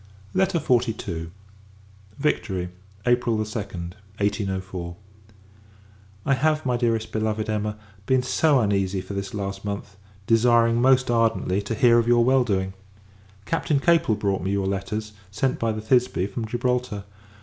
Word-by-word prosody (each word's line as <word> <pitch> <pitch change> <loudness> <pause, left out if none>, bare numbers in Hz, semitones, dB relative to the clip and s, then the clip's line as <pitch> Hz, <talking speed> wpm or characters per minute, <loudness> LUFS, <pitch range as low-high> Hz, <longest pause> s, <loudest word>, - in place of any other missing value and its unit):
LETTER 190 -1 +2
XLII. 115 - 0 0.9
Victory, 100 -11 -1 0.4
April 120 -2 +2
2d, 100 -5 -4 0.3
1804. 95 -4 -2 1.3
I 135 - +3
have, 155 +2 +1
my 125 -1 +1
Dearest 115 -2 0
Beloved 110 0 -1
Emma, 105 0 -2 0.3
been 130 -1 +3
so 145 +2 +3
uneasy 100 -2 +1
for 95 +2 -7
this 100 0 -4
last 100 -1 -4
month; 100 -1 -5 0.3
desiring, 115 +1 +4
most 130 -1 +4
ardently, 115 -4 +1
to 105 +3 -3
hear 120 +1 +5
of 115 - 0
your 120 0 +5
well 130 0 +4
doing! 95 -4 -1 0.7
Captain 155 -1 +1
Capel 165 -8 +3
brought 100 -2 -1
me 95 - -2
your 100 -1 0
letters, 100 +3 -3 0.2
sent 120 +6 -1
by 115 -1 +1
the 110 0 -4
Thisbe, 125 -4 +2
from 115 +2 -4
Gibraltar. 120 -2 -1
110 Hz, 140 wpm, -24 LUFS, 100-125 Hz, 1.3 s, hear